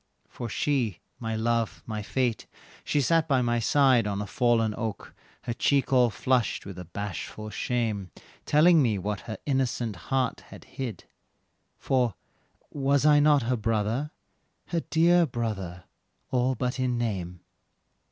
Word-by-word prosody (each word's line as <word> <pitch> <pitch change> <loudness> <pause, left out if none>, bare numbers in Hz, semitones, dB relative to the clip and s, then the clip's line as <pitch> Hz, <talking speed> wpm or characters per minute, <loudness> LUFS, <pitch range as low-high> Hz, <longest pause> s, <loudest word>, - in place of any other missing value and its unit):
For 120 - -7
she, 120 - 0 0.2
my 115 -1 -3
love, 115 0 -1
my 110 -1 -4
fate, 120 +2 -1 0.4
she 145 - +1
sat 165 +3 +2
by 135 -4 +2
my 120 0 +1
side 130 -2 +4
On 100 -1 -2
a 105 - -3
fallen 115 +2 +2
oak, 110 -3 -5 0.3
her 120 - -2
cheek 135 +3 +1
all 125 -2 +5
flushed 125 +2 0
with 95 -2 -8
a 90 - -7
bashful 100 +4 -6
shame, 110 -7 -2 0.4
Telling 160 +2 +6
me 115 -6 +2
what 100 +2 -3
her 110 - -4
innocent 125 -5 0
heart 130 -2 0
had - - -12
hid 120 -9 -6 0.7
"For 125 -4 +1 0.6
was 140 0 +1
not 145 -2 +5
I - - -4
her 130 - +3
brother, 110 +5 -1 0.6
her 170 - 0
dear 170 +1 +4
brother, 100 -8 -4 0.5
all 130 0 +1
but 125 +2 -2
in 125 -1 0
name." 95 -7 -3
120 Hz, 145 wpm, -27 LUFS, 105-135 Hz, 0.7 s, Telling